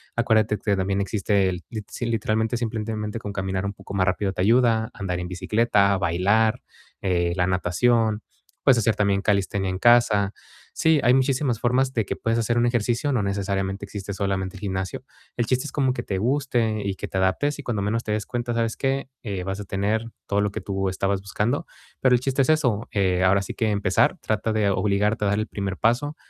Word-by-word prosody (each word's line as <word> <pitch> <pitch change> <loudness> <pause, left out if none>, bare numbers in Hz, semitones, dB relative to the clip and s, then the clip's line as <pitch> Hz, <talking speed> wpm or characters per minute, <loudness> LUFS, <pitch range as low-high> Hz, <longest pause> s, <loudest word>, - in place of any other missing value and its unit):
Acuérdate 110 -2 +2
que 105 -1 0
también 95 +1 0
existe 100 0 +1
el 90 -1 -5
l 110 -2 -5
sí 120 - -4
literalmente 110 0 0
simplemente 110 -1 -3
con 105 -2 -6
caminar 95 0 -2
un 100 - -3
poco 100 - -11
más 95 -1 +1
rápido 95 +1 0
te - - -3
ayuda, 115 +1 +3
andar 90 -3 -3
en 90 - -4
bicicleta, 100 +2 +2
bailar, 100 +5 +2 0.4
eh, 85 -2 +1
la 90 -1 +1
natación, 105 +5 +1 0.4
puedes 125 -3 +5
hacer 110 -1 +2
también 100 -1 +1
calistenia 100 -2 0
en 95 - -2
casa. 110 -4 +4 0.4
Sí, 160 -2 +3
hay 125 - +5
muchísimas 130 -2 +1
formas 130 +2 +1
de 115 - +1
que - - -3
puedes 115 +1 0
hacer 120 +1 0
un 120 - +3
ejercicio, 120 +4 0
no 120 -5 +1
necesariamente 100 0 -2
existe 100 0 -7
solamente 95 -1 -2
el 100 - -11
gimnasio. 95 -2 -3 0.3
El 120 - +1
chiste 130 +4 0
es 145 - -5
como 135 -3 +1
que - - -4
te 95 - -3
guste 120 -2 0
y 100 -1 -2
que - - -6
te 95 - -4
adaptes, 145 +11 +1
y - - -6
cuando 110 -6 -2
menos 115 +3 -1
te 105 - -2
des 105 -1 -2
cuenta, 120 -1 -3
¿sabes 115 -1 0
qué? 135 0 -1
Eh, 100 -6 -4
vas 95 +2 -4
a 100 - -6
tener 105 +4 -1 0.2
todo 100 0 +1
lo 105 - +1
que - - -5
tú 95 -1 -2
estabas 95 +1 -1
buscando. 115 +10 -2 0.3
Pero 125 -1 +5
el 120 - 0
chiste 135 +1 +1
es 135 - +1
eso, 125 -9 +2
eh, 95 -2 +1
ahora 100 +1 +3
sí - - -6
que 110 - 0
empezar, 100 -3 +2
trata 110 +1 -1
de 105 -2 +2
obligarte 105 +2 +1
a - - +2
dar 100 - +1
el 110 - 0
primer 100 -2 -4
paso, 140 +7 +1
105 Hz, 210 wpm, -24 LUFS, 95-120 Hz, 0.4 s, puedes